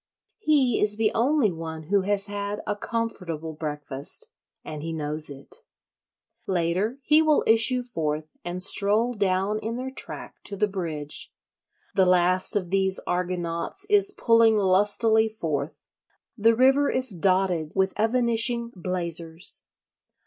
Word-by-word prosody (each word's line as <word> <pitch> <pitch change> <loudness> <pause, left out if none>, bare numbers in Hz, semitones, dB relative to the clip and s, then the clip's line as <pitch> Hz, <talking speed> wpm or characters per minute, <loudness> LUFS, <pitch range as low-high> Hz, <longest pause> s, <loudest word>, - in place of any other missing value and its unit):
He 285 - +2
is 210 0 +2
the 220 -1 +2
only 250 -2 +2
one 160 -1 -7
who 200 -1 +4
has 200 +1 0
had 205 0 -4
a 205 - -2
comfortable 180 -8 -4
breakfast—and 150 - -6
he 165 +1 -5
knows 155 0 -3
it. 140 -1 -10 0.9
Later 185 +6 -1
he 305 +3 +5
will 310 -2 +3
issue 230 +3 +4
forth 155 -10 -3 0.2
and 180 +1 -3
stroll 215 +5 +3
down 200 0 0
in 225 +2 -4
their 260 +1 -5
track 270 - -7
to 200 - -6
the 210 - +2
bridge. 160 -7 -5 0.6
The 190 -2 +3
last 185 +3 +3
of 185 -4 -2
these 190 -1 +1
Argonauts 175 - -3
is 400 -1 +4
pulling 230 - +3
lustily 210 +3 +3
forth; 155 -9 -4 0.5
the 230 +1 +3
river 270 +4 +4
is 255 0 0
dotted 185 -3 0
with 190 -1 +1
evanishing 235 +1 +2
blazers. 170 -2 -3
200 Hz, 130 wpm, -25 LUFS, 170-230 Hz, 0.9 s, he